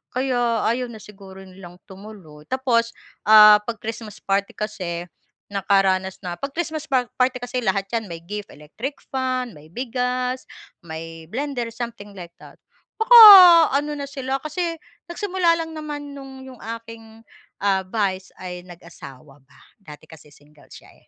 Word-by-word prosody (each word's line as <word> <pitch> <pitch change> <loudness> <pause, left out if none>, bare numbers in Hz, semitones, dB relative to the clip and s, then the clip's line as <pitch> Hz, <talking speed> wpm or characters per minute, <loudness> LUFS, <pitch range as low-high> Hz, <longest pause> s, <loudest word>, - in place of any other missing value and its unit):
kaya 245 -3 0
ayaw 250 +2 -1
na 220 - -11
siguro 195 -2 -13
nilang 185 -2 -13
tumuloy. 190 -7 -13
Tapos 235 -3 0 0.3
'pag 210 +1 +7
Christmas 220 -1 -7
party 200 0 -1
kasi, 180 -5 -4 0.5
nakaranas 195 -1 0
na 175 - -3
'pag 275 - -4
Christmas 315 -2 -4
party 255 -1 0
kasi 245 +1 -4
lahat 195 -3 -1
'yan 225 -4 -2
may 170 - -6
gift, 205 +3 -7
electric 215 - -8 0.2
fan, 255 -3 -2
may 150 +1 -16
bigas, 250 +3 -3 0.4
may 165 0 -9
blender, 255 0 -4
something 230 -3 -8
like 170 -2 -10
that. - - -15 0.4
Baka 470 +2 +8 0.6
ano 295 0 -5
na 280 -1 -5
sila, 270 -1 -4
kasi 335 +2 -3 0.4
nagsimula 350 -2 0
lang 325 0 -7
naman 290 -2 -7
no'ng 265 -1 -11
'yong 255 - -14 0.2
aking, 225 -1 -14 0.4
ah, 195 -1 +1
vice, 190 -1 -3
ay 180 -1 -7
nag-asawa 155 -6 -14
ba. 140 +1 -24 0.2
Dati 155 -5 -14
kasi 155 -2 -16
single 145 +1 -23
siya - - -15
eh. - - -28
220 Hz, 145 wpm, -22 LUFS, 185-260 Hz, 0.6 s, Baka